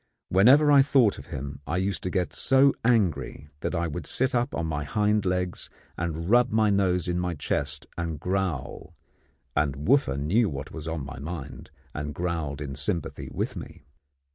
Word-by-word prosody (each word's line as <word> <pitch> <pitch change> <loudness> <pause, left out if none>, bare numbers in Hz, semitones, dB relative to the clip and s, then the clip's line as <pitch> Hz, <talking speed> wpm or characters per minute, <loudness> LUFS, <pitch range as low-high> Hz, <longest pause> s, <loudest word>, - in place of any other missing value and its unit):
Whenever 130 - +6
I 140 -1 +8
thought 135 -6 +3
of - - -11
him, 70 +1 -6
I 85 - -1
used 95 +1 -1
to 90 - -3
get 90 -1 -1
so 135 +1 +4
angry 100 - +1
that - - -3
I 85 0 0
would 75 -3 -4
sit 130 0 0
up 120 0 0
on 85 - -1
my 75 -2 -2
hind 105 +4 +1
legs 90 -1 -2 0.3
and 85 0 -3
rub 120 +4 +5
my 110 -1 +3
nose 95 -3 +2
in 90 0 0
my 90 -1 -2
chest 70 - -2
and 80 -3 -3
growl; 90 -6 -3 0.6
and 75 -1 0
Wooffa 130 - +3
knew 95 +10 +2
what 70 -2 -6
was 80 0 -7
in 80 -4 -3
my 65 -1 -8
mind, 75 -1 -7 0.2
and 75 -1 -5
growled 80 -4 -3
in 70 -2 -4
sympathy 80 -2 -3
with - - -3
me. - - -9
90 Hz, 180 wpm, -26 LUFS, 75-105 Hz, 0.6 s, I